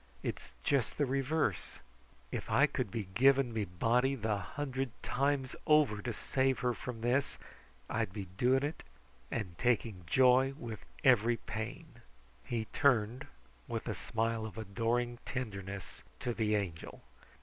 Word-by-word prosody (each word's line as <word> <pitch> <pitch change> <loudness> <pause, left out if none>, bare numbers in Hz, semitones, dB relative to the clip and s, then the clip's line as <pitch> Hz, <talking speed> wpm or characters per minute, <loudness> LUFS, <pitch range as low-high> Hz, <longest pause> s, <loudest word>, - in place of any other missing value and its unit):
"It's - - -5
just 135 -6 +1
the 145 - +3
reverse. 135 - 0 0.5
If - - -4
I 140 - +5
could 130 -6 -2
be 110 +1 -3
giving 135 +2 +4
me 110 -2 0
body 120 +9 +2
the 110 -3 0
hundred 135 +6 -3
times 135 0 0
over 150 -9 +4
to 120 - -2
save 130 +4 +1
hers 125 -1 +1
from 120 -3 -6
this, 125 +4 +1 0.5
I'd 110 -3 -1
be 100 0 -5
doing 130 +5 +3
it 150 +2 -3 0.5
and 95 -7 -3
take 120 -1 +3 0.2
joy 130 +5 +5
with 115 -6 -7 0.2
every 120 -3 +5
pain." 120 +6 -6 0.4
He 115 -2 -2
turned 125 -3 +2 0.4
with - - -4
a - - 0
smile 115 0 -1
of 110 0 -7
adoring 115 +3 -1
tenderness 100 -6 -5 0.2
to 120 - -1
the 110 -2 +1
Angel. 90 -6 -4
120 Hz, 140 wpm, -33 LUFS, 110-135 Hz, 0.5 s, I